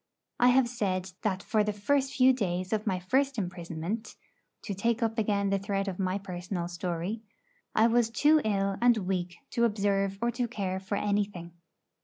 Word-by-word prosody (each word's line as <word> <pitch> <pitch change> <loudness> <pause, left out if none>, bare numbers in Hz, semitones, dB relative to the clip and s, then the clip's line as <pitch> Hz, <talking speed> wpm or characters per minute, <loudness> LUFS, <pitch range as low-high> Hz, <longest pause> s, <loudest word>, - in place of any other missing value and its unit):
I 245 - +6
have 250 0 +5
said 190 -6 -2
that 200 -3 -1
for 215 -2 +2
the 210 - 0
first 270 +7 0
few 260 -1 +6
days 185 -5 -2
of 215 0 -1
my 190 -2 +1
first 265 +9 +1
imprisonment 175 +2 -4 0.5
to 205 - -3
take 230 +4 0
up 225 0 0
again 200 -2 +1
the 195 - +2
thread 195 0 -2
of 190 -1 -4
my 185 0 0
personal 180 -2 -4
story 175 +4 -3 0.5
I 220 - +5
was 235 0 +3
too 300 +7 +4
ill 195 -2 0
and 240 -1 +5
weak 180 -3 -2
to 235 - +1
observe 200 -3 +1
or 235 +2 +1
to 240 +1 -1
care 190 -5 -3
for 190 +2 -3
anything. 200 -4 -1
200 Hz, 180 wpm, -29 LUFS, 185-230 Hz, 0.5 s, I